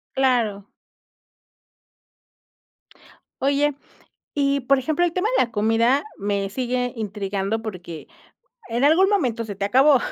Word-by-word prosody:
Claro. 235 -7 +1 2.7
Oye, 285 +2 +2 0.6
y, 280 -1 +1
por 275 +2 +3
ejemplo, 315 +6 0
el 345 - 0
tema 370 +5 0
de - - +4
la 235 - -11
comida 225 +5 +2 0.2
me 200 -1 -2
sigue 250 +2 -2
intrigando 205 0 -3
porque 180 -7 -8 0.6
en 240 +3 0
algún 335 +6 +5
momento 250 - 0
se 205 -3 -7
te 200 - -3
acabó. 265 +6 +5
245 Hz, 120 wpm, -22 LUFS, 205-280 Hz, 2.7 s, algún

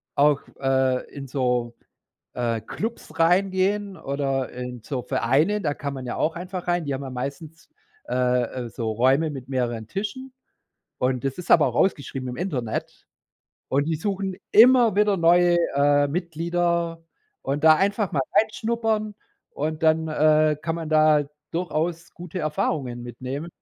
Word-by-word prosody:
auch, 145 0 +4 0.2
äh, 130 -1 +1
in 135 -1 -7
so, 125 -3 -1 0.6
äh, 115 -2 -1
Klubs 225 - -6
reingehen 190 +3 +2
oder 135 -3 -2
in 125 -2 -7
so 130 -1 -4
Vereine, 155 - +1
da 145 - 0
kann 145 -1 -5
man 130 -1 -6
ja 120 - -4
auch 160 +1 0
einfach 180 +1 -6
rein. 175 -2 +1
Die 140 - -2
haben 135 +1 -4
ja 130 - -6
meistens, 140 +6 -7 0.4
äh, 125 0 +2 0.2
äh, - - -7
so 115 -1 -4
Räume 135 +7 +2
mit 135 -3 -8
mehreren 120 -4 -2
Tischen. 215 - -5 0.7
Und 125 0 0
das 135 +4 -2
ist 180 - -7
aber 155 - +6
auch 120 - -5
ausgeschrieben 135 -7 0
im 125 - -5
Internet. 130 - -4 0.6
Und 140 +2 +1
die 165 - 0
suchen 195 +1 -3
immer 240 -1 +6
wieder 210 -1 +3
neue, 175 0 +4 0.2
äh, 145 0 +4
Mitglieder. 170 +1 -1 0.4
Und 145 +3 -3
da 155 0 +8
einfach 200 +2 0
mal 140 - +1 0.2
reinschnuppern 220 -1 0 0.4
und 155 +2 -4
dann, 160 0 +3
äh, 155 0 +3
kann 165 +1 -2
man 165 -2 -5
da 155 -1 +4 0.3
durchaus 165 0 -2
gute 175 +1 -7
Erfahrungen 135 -5 -2
mitnehmen. 130 +6 -6
155 Hz, 150 wpm, -24 LUFS, 130-175 Hz, 0.7 s, da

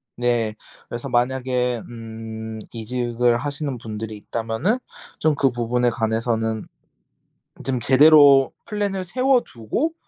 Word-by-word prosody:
네. 120 -3 0 0.3
그래서 120 +3 -6
만약에 125 -1 0
음 110 -1 -7
이직을 120 +1 0
하시는 140 +1 -3
분들이 110 -1 -6
있다면은 115 - -1 0.4
좀 155 -2 +2
그 135 -1 +3
부분에 120 +1 +1
관해서는 110 -1 -1 1.0
좀 130 -2 -1
"제대로 140 +1 +7
플랜을 200 -3 -2
세워두고 255 - 0
120 Hz, 245 characters per minute, -22 LUFS, 115-140 Hz, 1.0 s, 제대로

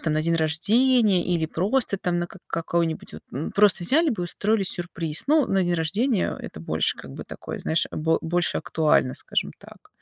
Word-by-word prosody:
там 155 - -1
на 155 - +1
день 165 +1 +1
рождения 200 +6 +3
или 170 -3 0
просто 200 +6 +1
там 175 -2 -1
на 175 - -2
как 185 +1 -14
какой-нибудь 165 -1 -2
вот, - - -10
м, 140 +6 -4
просто 200 -3 +4
взяли 305 - +4
бы 210 -6 -3
и - - -1
устроили 200 +3 0
сюрприз. 170 -4 -3
Ну, 305 -2 +4
на 195 -1 +1
день 175 0 0
рождения, 200 +8 0
а, - - -8
это 80 - -8
больше 80 -1 0
как 70 - -10
бы - - -8
такое - - -8
знаешь 160 - +1
бо 160 +1 0
больше 175 +1 0
актуально, 150 -5 +1
скажем - - -2
так. - - -16
175 Hz, 205 wpm, -24 LUFS, 160-205 Hz, -, просто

